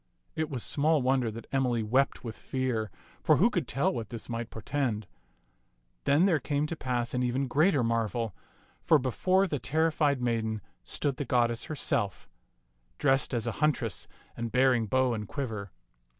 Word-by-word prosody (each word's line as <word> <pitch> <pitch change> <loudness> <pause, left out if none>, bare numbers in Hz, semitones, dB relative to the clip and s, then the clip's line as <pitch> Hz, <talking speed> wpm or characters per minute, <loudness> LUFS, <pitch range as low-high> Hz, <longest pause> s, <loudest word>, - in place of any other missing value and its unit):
It 160 -1 -1
was 130 -6 -3
small 150 -1 +2
wonder 130 -2 +2
that 115 +2 -8
Emily 125 -4 +1
wept 130 +6 +1
with 115 -2 -5
fear, 125 -5 -2 0.3
for - - +5
who 225 +7 +4
could 175 - -1
tell 135 +3 +1
what 115 -4 -4
this 115 0 -7
might 115 0 -3
portend? 115 -2 -2 1.0
Then 150 +6 +4
there 175 -6 +3
came 145 +2 -1
to 165 - -3
pass 125 -4 -2
an 125 - 0
even 125 +2 0
greater 150 +1 +3
marvel, 115 -2 -1 0.5
for 160 - +5
before 185 +9 +2
the 150 -7 -2
terrified 155 -2 +1
maiden 110 -3 -1 0.2
stood 140 -3 -2
the - - -2
goddess 120 -1 +1
herself, 115 - -1 0.7
dressed 135 -1 +2
as 120 -4 -1
a - - 0
huntress 135 -8 0 0.3
and 115 -1 -4
bearing 125 -3 +3
bow 130 +2 +2
and 105 -2 -4
quiver. 110 -8 -4
130 Hz, 165 wpm, -29 LUFS, 115-145 Hz, 1.0 s, for